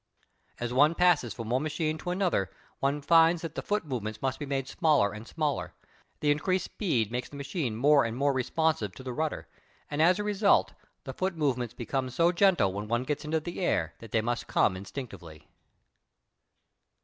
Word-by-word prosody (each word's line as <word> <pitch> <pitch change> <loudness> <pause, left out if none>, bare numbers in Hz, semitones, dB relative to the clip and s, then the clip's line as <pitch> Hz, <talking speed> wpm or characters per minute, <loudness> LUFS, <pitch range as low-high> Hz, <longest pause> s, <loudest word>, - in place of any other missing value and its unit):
As 120 0 -3
one 150 +5 +4
passes 170 -10 +3
from 115 -2 -6
one 130 +2 +2
machine 155 +1 -2
to 175 - -5
another 180 - 0 0.3
one 140 +2 0
finds 165 +1 +5
that 165 -2 -5
the - - -4
foot 210 -4 -1
movements 110 -6 -4
must 135 +1 -2
be 145 - -5
made 135 -1 -2
smaller 150 - +2
and 105 +2 -9
smaller. 145 - -2 0.5
The 150 - +3
increased 185 +5 0
speed 120 - -1
makes 125 +1 -3
the - - -12
machine 140 - -3
more 140 +4 +5
and 115 +1 -3
more 140 +1 +2
responsive 130 - 0
to 130 - -10
the 130 -1 -5
rudder, 155 +3 -3 0.4
and 145 +1 0
as 175 +3 +5
a 210 - -2
result 205 -1 +3 0.3
the 130 - -6
foot 185 +5 -2
movements 125 -6 -1
become 130 +2 -2
so 170 +7 +3
gentle 175 - +3
when 105 +2 -4
one 120 +2 0
gets 150 +3 -3
into 160 +1 0
the 170 +3 -7
air 85 - 0
that 115 -2 -12
they 110 - +2
must 120 +2 -2
come 95 - +2
instinctively. 95 - -9
140 Hz, 190 wpm, -29 LUFS, 120-160 Hz, 0.5 s, finds